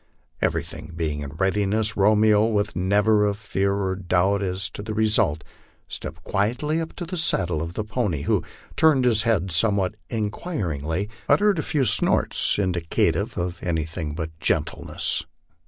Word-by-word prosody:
Everything 85 - -3
being 80 -3 -2
in 70 - -5
readiness, 105 +5 +1
Romeo, 105 +1 +4
with 105 -1 -1
never 105 +3 +3
a 100 - -1
fear 100 -2 -1
or 95 -2 -1
doubt 95 +2 +1
as 95 0 -1
to - - -7
the 105 +1 -5
result, 105 -7 +2 0.4
stepped 80 0 -7
quietly 125 - 0
up 160 - -6
to 175 - -5
the 180 +2 -5
side 95 - +1
of 80 +2 -3
the 110 - -2
pony, 105 - -2
who, - - +1 0.3
turning 155 -5 +4
his 115 -3 +4
head 105 -5 0
somewhat 95 +3 +2 0.2
inquiringly, 100 - -3 0.2
uttered 205 -4 +4
a - - +1
few 145 -3 0
snorts 105 - +3
indi 90 -4 0
cative 95 +7 0
of 85 -1 -3
anything 80 -2 -3
but 80 -1 -4
gentleness. 80 -1 -1
100 Hz, 155 wpm, -24 LUFS, 85-110 Hz, 0.4 s, Romeo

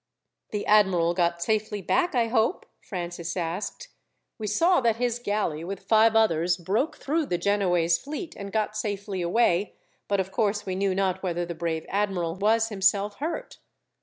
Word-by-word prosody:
"The 210 -1 -3
admiral 190 -5 +4
got 170 -1 0
safely 215 0 -1
back, 355 - +1
I 230 -2 +2
hope?" 230 +8 +1
Francis 175 -2 -5
asked. 180 - -4 0.5
"We 215 - -3
saw 330 - +3
that 230 -2 +2
his 240 0 -1
galley, 205 -9 -1
with 190 +2 -6
five 225 0 +4
others, 175 -5 +3
broke 205 - -1
through 305 +1 -1
the 175 - 0
Genoese 175 -3 +2
fleet 305 +4 -6
and 200 0 -7
got 215 0 -1
safely 205 -3 -3
away, 180 +1 +1 0.3
but 200 -1 +1
of 190 0 -2
course, 210 -1 0
we 185 - -3
knew 190 0 0
not 190 -1 0
whether 175 -2 -2
the 170 - -5
brave 160 -1 -3
admiral 190 -4 -1
was 220 +4 +2
himself 205 0 +1
hurt." 335 - -5
200 Hz, 165 wpm, -26 LUFS, 175-225 Hz, 0.5 s, admiral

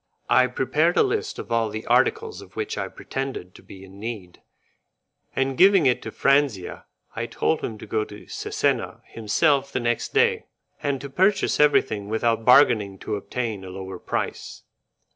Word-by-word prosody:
I 130 0 +5
prepared 150 +7 +1
a - - +6
list 425 0 -2
of - - -8
all 115 -1 +1
the 110 +1 -6
articles 445 0 +1
of - - -15
which 435 +1 -3
I - - -3
pretended 135 -9 -6
to - - -15
be 95 -1 -13
in 95 +1 -15
need, 105 -5 -7 0.9
and 135 0 0
giving 190 0 +6
it 125 -2 +2
to - - -7
Franzia 135 -9 +1 0.3
I 115 0 -3
told 160 +6 0
him 110 - -5
to - - -10
go 110 -1 -1
to 105 0 -12
Cesena - - -2
himself 140 +5 +1
the - - -1
next 120 -1 -1
day, 460 +1 +2 0.3
and 140 -2 -1
to 140 - -7
purchase 195 +6 +2
everything 110 -8 +2
without 115 +1 0
bargaining 110 -7 +5
to 105 - -4
obtain 110 -1 -4
a 95 - -8
lower 95 0 -7
price. - - -4
125 Hz, 170 wpm, -24 LUFS, 105-155 Hz, 0.9 s, a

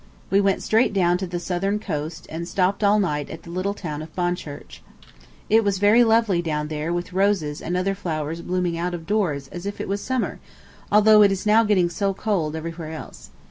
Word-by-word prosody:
We 195 +1 +4
went 195 -1 +1
straight 220 0 +2
down 180 -2 +2
to 190 - -3
the 175 0 -4
southern 190 +3 -1
coast, 155 -5 -5
and 165 +2 -5
stopped 190 +3 0
all 205 +1 +5
night 150 -7 -1
at 160 - -9
the 170 - -10
little 185 +3 -2
town 155 -6 -5
of 155 0 -9
Bonchurch. 175 -5 -4 0.7
It 225 +1 +4
was 200 -2 +1
very 210 +5 +5
lovely 225 -6 +3
down 150 -2 -2
there 155 +1 -3
with 175 +1 -3
roses 185 -6 +1
and 175 +2 -2
other 190 +2 0
flowers 165 -4 -4
blooming 175 -1 -1
out 175 +1 -2
of 165 -2 -8
doors 165 -9 0
as 180 +2 -7
if 200 - -5
it - - -4
was 200 +1 -2
summer, 260 -2 -2 0.5
although 215 +1 +7
it 200 -1 +6
is 195 +2 -3
now 215 +2 +5
getting 200 -5 +3
so 195 +3 -1
cold 175 -8 -1
everywhere 165 0 -6
else. 65 - -10
180 Hz, 210 wpm, -23 LUFS, 160-200 Hz, 0.7 s, although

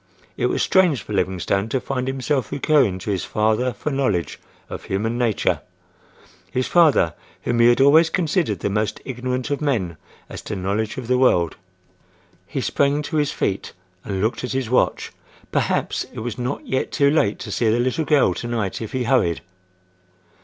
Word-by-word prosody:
It - - 0
was - - 0
strange 180 - +3
for - - -7
Livingstone 95 +2 0
to 130 - 0
find 130 0 -3
himself 135 -1 -1
recurring 135 - +2
to 95 +3 -4
his 95 -3 -1
father 110 +4 +1
for 135 +7 -4
knowledge 105 - -1 0.3
of - - -8
human 110 +4 -1
nature—his 120 +2 -4
father 155 - +4 0.3
whom 120 -1 0
he 115 - +6
had 120 - +4
always 155 +4 +6
considered 160 - 0
the - - 0
most 105 +1 -1
ignorant 130 +1 -3
of 145 - -1
men 105 - -1 0.3
as - - -8
to 105 - -5
knowledge 100 +3 -2
of 130 - -5
the 125 0 +2
world. 85 - +3 0.9
He - - -3
sprang 140 +1 +1
to 155 +1 -3
his 145 -1 +1
feet 95 - -2 0.3
and 95 -2 -3
looked 110 +3 -1
at 125 - -3
his 130 -3 -2
watch. 130 - +1 0.4
Perhaps, - - 0
it - - -7
was 120 0 -4
not 125 +3 -3
yet 130 - -1
too 140 -1 +3
late 110 -9 +2
to - - -7
see 115 - +1
the 110 - +2
little 130 +6 0
girl 150 -2 +3
to 120 - -5
night 115 -5 -2
if 110 - -6
he 130 -1 0
hurried? 120 -10 +2
125 Hz, 180 wpm, -22 LUFS, 105-140 Hz, 0.9 s, he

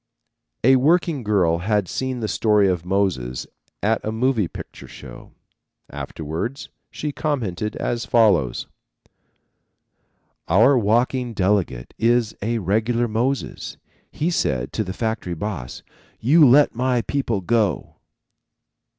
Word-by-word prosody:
A 130 +2 +6
working 160 +1 +2
girl 95 -7 +1
had 105 +1 0
seen 130 +2 -3
the 110 - -1
story 105 -2 +3
of 90 -3 0
Moses 90 -11 -1 0.4
at 110 +2 +1
a 110 - -2
moving 115 -3 +1
picture - - -10
show. - - -12 0.6
Afterwards 85 - -5 0.2
she 150 - -4
commented 110 - -2
as 120 -1 -3
follows: 95 - +2 1.8
"Our 115 +11 +5
walking 120 +2 +1
delegate 95 -11 0
is 115 -1 +2
a 115 +3 -1
regular 110 +4 0
Moses. 120 +5 -2 0.3
He 165 +4 -1
said 65 - -1
to - - -1
the 95 - -5
factory 110 -4 -3
boss, 80 - -6 0.4
'You 150 +5 +5
let 145 +4 +5
my 125 0 0
people 120 -8 -1
go.'" 105 - 0
110 Hz, 115 wpm, -22 LUFS, 95-125 Hz, 1.8 s, A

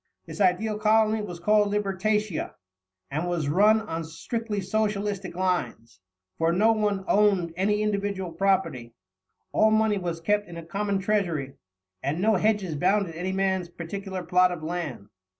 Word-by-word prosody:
This - - -7
ideal 205 +3 +2
colony 220 0 +3
was 180 -5 -7
called 210 +3 +3
Libertatia, 210 -1 -1 0.6
and 155 +5 -2
was 165 -5 -1
run 210 +7 +4
on 165 -6 -4
strictly 210 +7 -4
Socialistic 200 -2 -2
lines, 180 - -2 0.4
for 165 +1 +3
no 210 +6 +4
one 210 -3 0
owned 195 -5 +3
any 210 +3 +1
individual 200 -3 -2
property; 165 -10 0 0.6
all 220 - +4
money 220 -1 +2
was 170 -2 -3
kept 205 +5 0
in 170 -1 -9
a 165 - -8
common 200 +3 -1
treasury, 180 -9 -1 0.5
and 150 +4 -2
no 220 +4 +3
hedges 205 -4 0
bounded 190 +2 +1
any 180 +3 -3
man's 190 -2 0
particular 185 +2 -6
plot 180 +1 +3
of 170 -3 -6
land. 160 - -4
190 Hz, 150 wpm, -26 LUFS, 170-210 Hz, 0.6 s, run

